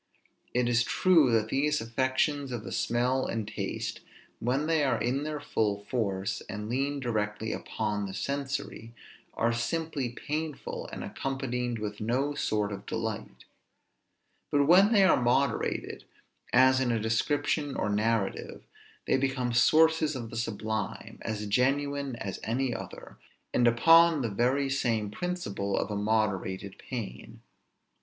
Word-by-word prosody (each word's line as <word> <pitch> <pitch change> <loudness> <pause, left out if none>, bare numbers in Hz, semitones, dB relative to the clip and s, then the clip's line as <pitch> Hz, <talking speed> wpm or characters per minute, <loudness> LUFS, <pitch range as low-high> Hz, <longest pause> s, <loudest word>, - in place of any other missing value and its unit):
It 125 -1 +2
is 120 0 +3
true 165 -7 +4
that 110 -1 +2
these 150 +4 +1
affections 130 +4 0
of 120 -3 -4
the - - -7
smell 125 +2 +1
and 110 -2 -3
taste, 105 - -4 0.4
when 130 +5 0
they 160 -1 +2
are 130 -5 +1
in 130 +3 0
their 150 -1 -3
full 105 -7 -1
force, 100 -5 -2
and 105 0 -5
lean 140 +4 -1
directly 110 -3 -2
upon 105 -2 -3
the 95 - -7
sensory, 135 -5 -4 0.4
are 115 +1 +1
simply 145 +2 -2
painful, 150 +4 -4
and - - -6
accompanied 125 -3 -3
with 105 -1 -5
no 130 +6 0
sort 105 -7 -1
of 100 - -7
delight; 110 -2 -4 1.0
but 145 -1 +3
when 190 +7 +6
they 205 -4 +6
are 185 -9 +5
moderated, 125 +1 0 0.5
as 130 +1 +5
in 130 -2 +1
a 115 - +1
description 140 +6 0
or - - -1
narrative, 105 0 -1 0.4
they - - +2
become 130 -2 -1
sources 155 +4 +4
of 115 -3 -6
the - - -7
sublime, 110 -1 -3
as 105 -1 -3
genuine 140 +4 0
as 100 -4 -5
any 125 +2 0
other, - - -9 0.3
and 120 - +4
upon 165 +5 +6
the 115 - 0
very 130 +7 +1
same 115 -6 0
principle 105 - -3
of 105 - -1
a - - -2
moderated 100 -2 -1
pain. 110 - -7
120 Hz, 140 wpm, -29 LUFS, 110-140 Hz, 1.0 s, when